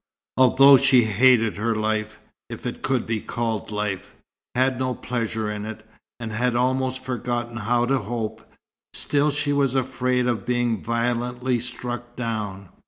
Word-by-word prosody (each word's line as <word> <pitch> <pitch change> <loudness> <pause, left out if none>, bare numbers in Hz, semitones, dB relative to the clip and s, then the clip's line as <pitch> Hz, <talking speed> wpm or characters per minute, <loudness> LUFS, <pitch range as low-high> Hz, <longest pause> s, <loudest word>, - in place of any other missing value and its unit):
Although 135 +2 +7
she 130 -2 +5
hated 115 0 +4
her 115 +2 0
life, 110 0 -1 0.3
if - - -8
it - - -4
could 130 -3 0
be 110 -2 -2
called 115 -3 -3
life, 105 -3 -4 0.4
had 130 0 +2
no 130 -1 -1
pleasure 115 -3 -3
in 105 0 -5
it, 110 0 -8 0.3
and 115 -2 -5
had 120 +2 0
almost 130 +1 0
forgotten 120 -2 -3
how 120 +3 +1
to 135 +1 +1
hope, 110 0 -4 0.5
still 145 +1 +1
she 145 0 0
was 140 -2 +1
afraid 125 -1 0
of 120 -5 0
being 120 -2 0
violently 120 +2 -1
struck 120 0 -6
down. 105 -6 -4
120 Hz, 150 wpm, -24 LUFS, 110-130 Hz, 0.5 s, Although